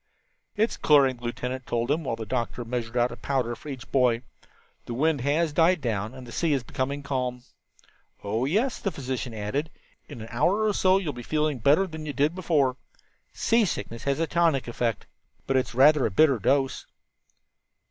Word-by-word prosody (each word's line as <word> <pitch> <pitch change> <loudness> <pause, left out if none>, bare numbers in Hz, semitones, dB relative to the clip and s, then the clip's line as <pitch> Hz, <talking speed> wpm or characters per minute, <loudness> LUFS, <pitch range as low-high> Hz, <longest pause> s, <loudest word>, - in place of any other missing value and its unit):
"It 220 +1 +3
is - - -6
clearing," 140 -4 +4
the 120 - -11
lieutenant 125 +2 -4
told 120 +1 -1
them, 160 +2 0
while 130 - -2
the 115 - -6
doctor 120 +1 -3
measured 120 0 -3
out 120 +1 +2
a - - -6
powder 125 -4 -1
for 150 - -11
each 130 -3 -8
boy. 125 -2 +2 0.6
"The 120 - -4
wind 150 +1 +1
has 150 +4 +1
died 170 +3 +4
down 110 -3 -3
and 130 -1 -10
the 120 - -11
sea 165 +2 0
is 135 -4 0
becoming 140 +4 -3
calm." 125 -3 -2 0.8
"Oh, 110 +5 -1
yes," 220 - 0
the 195 - -1
physician 130 -6 -4
added, 110 +8 -3 0.4
"in - - -8
an 110 - -7
hour 180 - +2
or 210 - +2
so 190 -1 +4
you 195 - -3
will 150 - -2
be 120 - -8
feeling 150 +1 -1
better 145 - +4
than 160 -3 -8
you 145 - -3
did 145 +4 +1
before. 150 -8 +1 0.5
Seasickness 200 - 0
has 140 +1 0
a 165 - +2
tonic 165 -5 +1
effect, 120 -1 -2 0.4
but 135 - 0
it's 130 -1 0
rather 145 +2 +5
a - - -2
bitter 135 +4 +4
dose." 135 +5 0
135 Hz, 195 wpm, -26 LUFS, 120-155 Hz, 0.8 s, rather